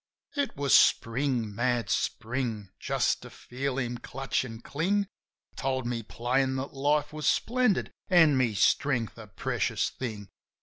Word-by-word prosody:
It 285 Hz, -, -1 dB
was 140 Hz, -1 st, +1 dB
Spring! 120 Hz, -2 st, +3 dB
Mad 120 Hz, +1 st, 0 dB
Spring! 115 Hz, -4 st, -2 dB
Just -, -, 0 dB
to -, -, -10 dB
feel 130 Hz, +1 st, -4 dB
him 120 Hz, -2 st, -2 dB
clutch 135 Hz, +2 st, -2 dB
an' 115 Hz, -3 st, -8 dB
cling 190 Hz, +10 st, 0 dB, 0.5 s
Told 130 Hz, -2 st, -1 dB
me 120 Hz, -1 st, -2 dB
plain 130 Hz, +4 st, 0 dB
that 135 Hz, +1 st, -4 dB
life 145 Hz, +2 st, +1 dB
was 155 Hz, -1 st, -3 dB
splendid 245 Hz, -4 st, +2 dB, 0.2 s
an' 165 Hz, -6 st, +6 dB
my 125 Hz, -4 st, +2 dB
strength 120 Hz, +2 st, +1 dB
a 110 Hz, -, -10 dB
precious 100 Hz, -, -1 dB
thing. 105 Hz, -6 st, -6 dB
130 Hz, 140 wpm, -28 LUFS, 115-145 Hz, 0.5 s, an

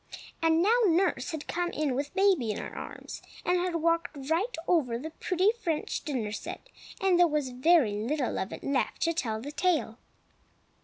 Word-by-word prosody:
And 325 Hz, +1 st, +3 dB
now 440 Hz, +5 st, +4 dB
nurse 340 Hz, -6 st, +2 dB
had 315 Hz, -3 st, -5 dB
come 350 Hz, 0 st, -1 dB
in 300 Hz, -5 st, -1 dB
with 285 Hz, +6 st, -3 dB
baby 380 Hz, -, +3 dB
in 210 Hz, -, -1 dB
her -, -, -6 dB
arms, -, -, -8 dB, 0.2 s
and 360 Hz, 0 st, +2 dB
had 355 Hz, -1 st, -1 dB
walked 335 Hz, -1 st, 0 dB
right 400 Hz, +9 st, +1 dB
over 265 Hz, -10 st, +2 dB
the 310 Hz, +6 st, -6 dB
pretty 370 Hz, +5 st, +1 dB
French 340 Hz, -10 st, -3 dB
dinner 245 Hz, -8 st, -2 dB
set, 225 Hz, -, -7 dB, 0.3 s
and 380 Hz, -3 st, +3 dB
there 350 Hz, -, +7 dB
was 295 Hz, -4 st, -1 dB
very 255 Hz, -1 st, +4 dB
little 245 Hz, +6 st, -1 dB
of 190 Hz, -, -3 dB
it -, -, -8 dB
left 275 Hz, -2 st, 0 dB
to 335 Hz, -, +2 dB
tell 225 Hz, -10 st, -2 dB
the 280 Hz, +6 st, -6 dB
tale. 295 Hz, -9 st, 0 dB
320 Hz, 185 wpm, -29 LUFS, 260-355 Hz, 0.3 s, there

